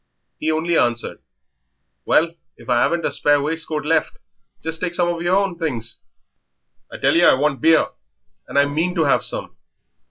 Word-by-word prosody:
He 155 Hz, -, 0 dB
only 165 Hz, +2 st, +1 dB
answered 120 Hz, 0 st, 0 dB, 0.9 s
"Well, 165 Hz, +1 st, +2 dB, 0.2 s
if -, -, -16 dB
I 120 Hz, -1 st, +3 dB
'aven't 170 Hz, -1 st, 0 dB
a -, -, 0 dB
spare 145 Hz, 0 st, +2 dB
waistcoat 155 Hz, 0 st, -3 dB
left 160 Hz, 0 st, 0 dB, 0.5 s
just 160 Hz, 0 st, -4 dB
take 175 Hz, -1 st, -1 dB
some 175 Hz, -1 st, +2 dB
of 170 Hz, -1 st, -3 dB
yer 175 Hz, -, -1 dB
own 195 Hz, -3 st, 0 dB
things. 115 Hz, -8 st, -4 dB, 0.9 s
I -, -, -7 dB
tell -, -, +2 dB
yer 175 Hz, -, +6 dB
I -, -, +5 dB
want 145 Hz, 0 st, -1 dB
beer, 160 Hz, 0 st, +5 dB, 0.6 s
and -, -, -4 dB
I 145 Hz, -, +5 dB
mean 160 Hz, +5 st, -1 dB
to 165 Hz, -, +2 dB
have 140 Hz, -, +2 dB
some." -, -, -5 dB
160 Hz, 180 wpm, -20 LUFS, 145-170 Hz, 0.9 s, yer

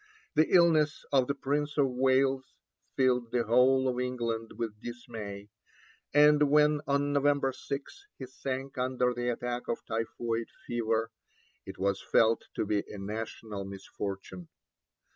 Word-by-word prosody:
The 155 Hz, -, +4 dB
illness 160 Hz, -4 st, +4 dB
of 130 Hz, -3 st, +3 dB
the 140 Hz, -, -1 dB
Prince 145 Hz, +2 st, -2 dB
of 140 Hz, -2 st, +4 dB
Wales 130 Hz, +1 st, +1 dB, 0.4 s
filled 125 Hz, -3 st, +2 dB
the 120 Hz, -1 st, +1 dB
whole 130 Hz, +3 st, +4 dB
of 125 Hz, -1 st, -1 dB
England 115 Hz, -3 st, -2 dB
with 110 Hz, -3 st, -4 dB
dismay, 110 Hz, -4 st, -7 dB, 0.6 s
and 150 Hz, 0 st, +5 dB
when, 150 Hz, 0 st, +4 dB
on 140 Hz, 0 st, +1 dB
November 140 Hz, -1 st, +2 dB
6, 140 Hz, -, -7 dB
he -, -, -6 dB
sank 130 Hz, +1 st, -5 dB
under 125 Hz, -1 st, +1 dB
the 120 Hz, 0 st, -2 dB
attack 120 Hz, 0 st, -3 dB
of 115 Hz, -, -3 dB
typhoid 115 Hz, 0 st, -2 dB, 0.2 s
fever, 115 Hz, -1 st, -1 dB, 0.6 s
it -, -, -8 dB
was 100 Hz, 0 st, 0 dB
felt 115 Hz, 0 st, +3 dB
to -, -, -1 dB
be 105 Hz, 0 st, +1 dB
a 105 Hz, -, -8 dB
national 105 Hz, 0 st, -5 dB
misfortune. 95 Hz, -2 st, -7 dB
125 Hz, 140 wpm, -30 LUFS, 115-140 Hz, 0.6 s, and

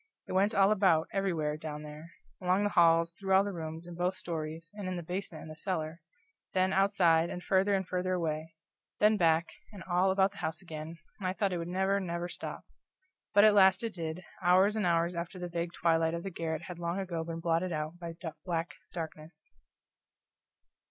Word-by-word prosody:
It -, -, -7 dB
went 200 Hz, +4 st, +2 dB
all 195 Hz, +1 st, +5 dB
about, 185 Hz, -6 st, +3 dB
everywhere, 165 Hz, -6 st, 0 dB
down 150 Hz, -1 st, -6 dB
there: 150 Hz, +2 st, -10 dB, 0.3 s
along 185 Hz, +2 st, +2 dB
the 205 Hz, -, +1 dB
halls, 165 Hz, 0 st, +5 dB
through 190 Hz, +3 st, -2 dB
all 190 Hz, -, +6 dB
the 200 Hz, 0 st, -3 dB
rooms, 160 Hz, 0 st, -6 dB
in 175 Hz, -, -8 dB
both 180 Hz, +2 st, 0 dB
stories, 165 Hz, 0 st, -5 dB
and 205 Hz, -2 st, -6 dB
in 185 Hz, -, -2 dB
the 175 Hz, -, -4 dB
basement 180 Hz, -1 st, -5 dB
and 155 Hz, -, -9 dB
the -, -, -8 dB
cellar; 160 Hz, -1 st, -3 dB, 0.5 s
then 185 Hz, 0 st, +3 dB
outside, 175 Hz, -4 st, +4 dB
and 180 Hz, -, -6 dB
farther 195 Hz, +1 st, +3 dB
and 190 Hz, -2 st, -1 dB
farther 185 Hz, 0 st, -1 dB
away 160 Hz, -2 st, -2 dB, 0.4 s
then 210 Hz, +1 st, +5 dB
back, 165 Hz, -3 st, +3 dB, 0.2 s
and 200 Hz, -4 st, -9 dB
all 180 Hz, +1 st, +2 dB
about 190 Hz, 0 st, +3 dB
the 200 Hz, -, -16 dB
house 160 Hz, 0 st, -2 dB
again, 160 Hz, -1 st, -7 dB, 0.2 s
and 190 Hz, -, -2 dB
I 185 Hz, -, 0 dB
thought 195 Hz, -1 st, 0 dB
it 175 Hz, -, -1 dB
would 170 Hz, -, -4 dB
never, 190 Hz, +2 st, +1 dB
never 170 Hz, -2 st, -3 dB
stop. -, -, -6 dB, 0.7 s
But 205 Hz, -, +8 dB
at 215 Hz, -1 st, +7 dB
last 190 Hz, 0 st, +5 dB
it 225 Hz, -2 st, -2 dB
did, 165 Hz, +1 st, -5 dB, 0.2 s
hours 185 Hz, +4 st, +4 dB
and 210 Hz, -4 st, +1 dB
hours 170 Hz, +1 st, +2 dB
after 170 Hz, +2 st, -5 dB
the 180 Hz, -1 st, -4 dB
vague 170 Hz, 0 st, -3 dB
twilight 165 Hz, -1 st, +2 dB
of 170 Hz, -, -5 dB
the 195 Hz, -, -4 dB
garret 160 Hz, -2 st, -3 dB
had 180 Hz, -1 st, -8 dB
long 170 Hz, +1 st, -2 dB
ago 175 Hz, -4 st, -3 dB
been 165 Hz, 0 st, -5 dB
blotted 170 Hz, +2 st, 0 dB
out 155 Hz, +2 st, -3 dB
by 170 Hz, -1 st, -6 dB, 0.3 s
black 170 Hz, -2 st, -2 dB, 0.2 s
darkness. 160 Hz, -, -7 dB
175 Hz, 205 wpm, -31 LUFS, 165-190 Hz, 0.7 s, But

